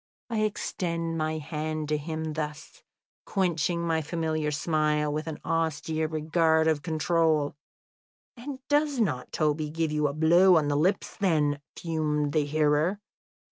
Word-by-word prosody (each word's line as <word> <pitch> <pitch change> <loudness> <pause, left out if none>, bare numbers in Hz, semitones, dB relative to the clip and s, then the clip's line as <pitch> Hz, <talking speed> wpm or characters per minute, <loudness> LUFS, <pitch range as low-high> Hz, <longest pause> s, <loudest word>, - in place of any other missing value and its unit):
"I 225 - 0
extend 170 -5 -2
my 155 0 -1
hand 155 0 -3
to 150 - +2
him 160 +1 -4
thus, 150 -1 -6 0.4
quenching 170 -3 0
my 160 -1 +1
familiar 160 -1 -1
smile 150 -1 0
with 155 +1 -3
an 160 - -4
austere 160 -1 -1
regard 160 +1 +2
of 155 -2 +2
control 160 -2 +1 0.4
" - - -82
"And 260 +2 -7
does 290 -2 +2
not 130 - -1
Toby 155 -1 0
give 160 0 -1
you 150 -1 +1
a 140 - -3
blow 170 +4 +5
on 150 -2 +1
the 145 - +1
lips 180 +7 +1
then?" 150 -7 +1 0.2
fumed 150 -3 -1
the 150 -2 +2
hearer. 155 +5 +1
155 Hz, 145 wpm, -27 LUFS, 150-165 Hz, 0.4 s, blow